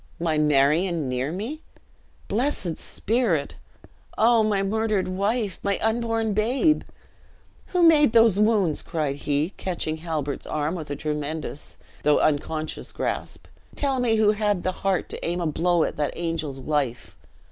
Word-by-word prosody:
"My 160 -2 0
Marion 150 +3 +2
near 125 +3 -2
me! 230 - -5 0.7
Blessed 220 - -1
spirit! 205 - -1 0.6
Oh, 230 +1 +5
my 210 -2 +1
murdered 215 -1 0
wife! 200 +2 -1
my 200 -1 0
unborn 225 -1 0
babe! 250 +9 +2 0.9
Who 360 -1 +1
made 300 -6 +6
those 225 -4 +5
wounds?" 210 -7 +2
cried 150 -4 -2
he, 145 +4 -1
catching 170 -4 -3
Halbert's 155 -4 -4
arm 150 +2 -1
with 160 -5 -6
a 145 - -2
tremendous 150 0 -4 0.2
though 150 0 +4
unconscious 155 +1 -1
grasp; - - -4 0.3
"tell 275 -2 0
me 235 -3 +2
who 215 -1 +4
had 210 -3 0
the 185 - 0
heart 190 0 -1
to - - -7
aim 175 +1 -1
a 175 - -1
blow 170 +2 +2
at - - -3
that 150 -1 -2
angel's 165 -5 -3
life?" 135 -3 -2
180 Hz, 145 wpm, -24 LUFS, 155-220 Hz, 0.9 s, made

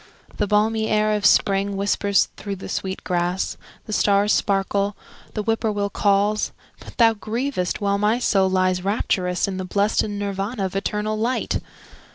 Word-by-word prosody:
The 210 - 0
balmy 220 +2 +2
air 215 0 +2
of 210 -2 +3
spring 195 0 +2
whispers 200 0 +2
through 200 -1 -5
the 190 - -9
sweet 190 0 -4
grass, 175 +1 -1 0.3
The 215 - -5
stars 205 0 +3
sparkle, 200 0 0 0.4
the 210 - -1
whippoorwill 210 -2 0
calls, 205 +1 +1 0.3
But - - -13
thou 230 -2 +6
grievest, 220 -3 -3
while 200 0 +1
my 210 +3 +2
soul 195 -6 +2
lies 185 -1 +1
rapturous 185 -3 0
In 190 -1 -4
the 185 - -3
blest 200 +3 +1
Nirvana 205 +1 -3
of 190 - -5
eternal 210 +2 -1
light! 240 +4 0
200 Hz, 155 wpm, -22 LUFS, 195-215 Hz, 0.4 s, thou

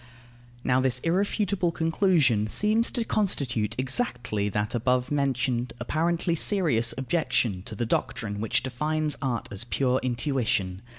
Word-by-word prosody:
Now 130 0 +2
this 130 -1 +2
irrefutable 185 0 0
conclusion 160 - +2
seems 215 - +2
to 235 - -2
constitute 130 - 0
exactly 120 - -1
that 105 +1 -2
above 125 +2 0
mentioned 130 -4 0
apparently 165 +6 0
serious 155 - +2
objection 130 - 0
to 110 - -6
the 120 - -2
doctrine 105 -2 -2
which 120 +2 0
defines 150 +4 -1
art 125 -4 -2
as 100 - -3
pure 130 +1 +1
intuition. 120 -7 -1
130 Hz, 125 wpm, -26 LUFS, 115-165 Hz, -, Now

